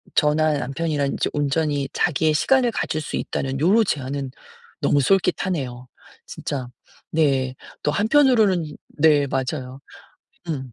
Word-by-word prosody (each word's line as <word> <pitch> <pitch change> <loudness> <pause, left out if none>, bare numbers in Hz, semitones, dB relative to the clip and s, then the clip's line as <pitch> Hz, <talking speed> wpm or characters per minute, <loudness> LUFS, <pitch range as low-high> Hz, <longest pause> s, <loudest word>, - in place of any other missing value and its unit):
저나 150 0 +3
남편이랑 140 +1 -2
이제 - - -1
온전히 145 -1 0
자기의 155 0 +1
시간을 245 - +3
가질 155 - -2
수 - - -5
있다는 135 0 -3
요런 200 +9 +4
제안은 140 -3 -3 0.5
너무 145 - +3
솔깃하네요, 145 -8 0 0.4
진짜. 130 -3 -5 0.4
네. 135 -5 +1 0.3
또 150 - +1
한편으로는 215 - +3 0.2
네 145 -2 +4
맞아요. 130 0 -3 0.7
음. 130 -6 -4
150 Hz, 275 characters per minute, -22 LUFS, 135-165 Hz, 0.7 s, 요런